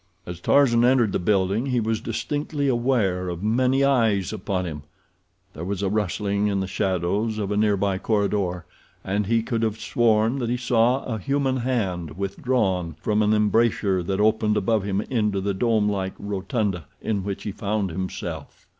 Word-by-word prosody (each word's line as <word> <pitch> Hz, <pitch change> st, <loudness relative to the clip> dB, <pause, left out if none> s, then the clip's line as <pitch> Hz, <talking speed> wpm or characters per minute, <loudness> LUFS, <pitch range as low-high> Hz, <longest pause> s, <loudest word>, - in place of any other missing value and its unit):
As 90 Hz, -1 st, -7 dB
Tarzan 120 Hz, +2 st, +4 dB
entered 125 Hz, -4 st, +4 dB
the -, -, 0 dB
building 100 Hz, +5 st, +1 dB
he 125 Hz, -2 st, +1 dB
was 110 Hz, -1 st, -1 dB
distinctly 145 Hz, -1 st, -2 dB
aware 120 Hz, -8 st, +1 dB
of 85 Hz, +1 st, -5 dB
many 130 Hz, +5 st, +2 dB
eyes 110 Hz, -9 st, +2 dB
upon 95 Hz, -2 st, -2 dB
him. 75 Hz, -3 st, -5 dB, 0.7 s
There 80 Hz, -, -7 dB
was 100 Hz, +2 st, -3 dB
a 95 Hz, -, +1 dB
rustling 100 Hz, 0 st, 0 dB
in 100 Hz, -1 st, 0 dB
the 95 Hz, -, -1 dB
shadows 95 Hz, +3 st, -1 dB
of 105 Hz, -2 st, -2 dB
a -, -, 0 dB
near 105 Hz, -1 st, +2 dB
by 95 Hz, -1 st, 0 dB
corridor, 100 Hz, -5 st, 0 dB, 0.4 s
and 100 Hz, +1 st, -1 dB
he 115 Hz, 0 st, +2 dB
could 115 Hz, -1 st, -2 dB
have 110 Hz, -1 st, -1 dB
sworn 115 Hz, +2 st, +2 dB
that 120 Hz, -2 st, -2 dB
he 125 Hz, -, 0 dB
saw 125 Hz, +1 st, +2 dB
a 110 Hz, -3 st, -3 dB
human 135 Hz, +3 st, 0 dB
hand 95 Hz, -, -2 dB
withdrawn 100 Hz, -, -1 dB
from 105 Hz, +5 st, +1 dB
an 105 Hz, 0 st, +3 dB
embrasure 105 Hz, -3 st, +2 dB
that 95 Hz, +3 st, -2 dB
opened 105 Hz, 0 st, +2 dB
above 110 Hz, +1 st, +1 dB
him 100 Hz, 0 st, -1 dB
into 105 Hz, -5 st, 0 dB
the 100 Hz, +1 st, -1 dB
domelike 105 Hz, -3 st, 0 dB
rotunda 100 Hz, -, -2 dB, 0.2 s
in 100 Hz, -3 st, -1 dB
which 100 Hz, 0 st, -4 dB
he 105 Hz, -, -3 dB
found 100 Hz, -1 st, -2 dB
himself. 95 Hz, +2 st, -6 dB
105 Hz, 170 wpm, -24 LUFS, 95-115 Hz, 0.7 s, Tarzan